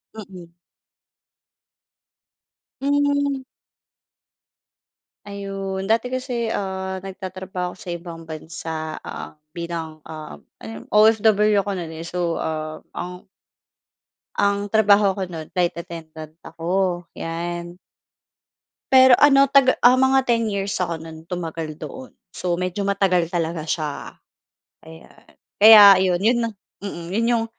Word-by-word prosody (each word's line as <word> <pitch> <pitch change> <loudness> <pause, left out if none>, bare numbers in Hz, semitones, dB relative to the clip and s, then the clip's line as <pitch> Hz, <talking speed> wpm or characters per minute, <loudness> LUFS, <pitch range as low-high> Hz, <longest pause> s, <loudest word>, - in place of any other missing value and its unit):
Mm. 185 -5 -11 2.3
Hmm. 285 -1 +1 1.8
Ayun, 195 -1 -5
dati 230 +3 +1
kasi, 245 -3 -2
ah, 190 -2 -3
nagtatrabaho 185 -1 -6
ako - - -13
sa 175 - -6
ibang 165 -1 -10
bansa. 160 0 -6
Ah, 155 - -9 0.2
bilang, 165 -2 -6
uhm, 155 - -10 0.2
ano 110 - -9
yon? - - -23
OFW 215 -1 +4
ako 205 - -3
no'n, 160 -2 -7
eh. 160 - -7
So, 170 0 -2
ah, 155 0 -4
ang 180 0 -7 1.1
ang 200 0 +1
trabaho 205 -1 +4
ko 195 - -4
no'n 160 -3 -8
flight 175 -1 0
attendant 160 -2 -9
ako, 175 +1 -2
'yan. 175 +1 -5 1.1
Pero 260 -1 +8
ano 275 -1 +6
taga 275 -2 +4
ah, 245 +1 +7
mga 265 0 +3
10 230 -2 +1
years 200 0 -2
ako 170 -2 -2
no'n 160 0 -11
tumagal 165 -3 -5
doon. 260 -1 -9 0.2
So, 175 -1 -2
medyo 185 +2 -3
matagal 190 -4 +1
talaga 165 -2 -2
siya. 150 -2 -4 0.7
Ayan, 160 0 -15 0.3
kaya 215 +1 +10 0.2
ayon, 185 -2 +1
'yon 235 +3 +3
na 230 - 0 0.3
mm, 175 -4 -6
'yon 230 +3 +1
'yung 230 -2 +1
185 Hz, 120 wpm, -22 LUFS, 165-215 Hz, 2.3 s, kaya